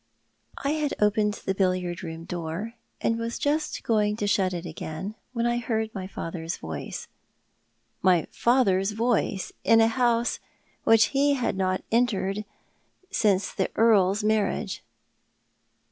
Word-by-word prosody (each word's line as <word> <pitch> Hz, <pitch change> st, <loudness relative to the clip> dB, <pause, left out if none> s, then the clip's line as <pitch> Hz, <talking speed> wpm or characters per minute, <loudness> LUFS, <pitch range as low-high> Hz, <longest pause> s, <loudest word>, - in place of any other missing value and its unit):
I 280 Hz, -, -1 dB
had 305 Hz, -2 st, -1 dB
opened 210 Hz, 0 st, +2 dB
the 190 Hz, -, +1 dB
billiard 185 Hz, -2 st, 0 dB
room 165 Hz, -1 st, -6 dB
door, 175 Hz, +6 st, -4 dB, 0.3 s
and 230 Hz, 0 st, +1 dB
was 230 Hz, 0 st, -3 dB
just 300 Hz, +1 st, -1 dB
going 210 Hz, -2 st, +2 dB
to 210 Hz, -, -2 dB
shut 195 Hz, -2 st, +2 dB
it 175 Hz, -1 st, -4 dB
again 160 Hz, +4 st, -5 dB, 0.2 s
when 235 Hz, -1 st, 0 dB
I 240 Hz, 0 st, +2 dB
heard 220 Hz, -2 st, -2 dB
my 190 Hz, -2 st, -5 dB
father's 165 Hz, -3 st, -5 dB
voice. -, -, -6 dB, 0.9 s
My 180 Hz, -4 st, +4 dB
fiither's 210 Hz, -5 st, +2 dB
voice 225 Hz, -4 st, 0 dB
in 225 Hz, -, +5 dB
a 225 Hz, -, +6 dB
house 235 Hz, 0 st, +1 dB, 0.5 s
which 225 Hz, -1 st, +6 dB
he 285 Hz, +1 st, +3 dB
had 245 Hz, -6 st, -1 dB
not 185 Hz, -1 st, 0 dB
entered 210 Hz, -3 st, +1 dB, 0.7 s
since 205 Hz, -, +2 dB
the -, -, 0 dB
Earl's 210 Hz, -3 st, +4 dB
marriage 215 Hz, -1 st, 0 dB
210 Hz, 135 wpm, -26 LUFS, 185-230 Hz, 0.9 s, a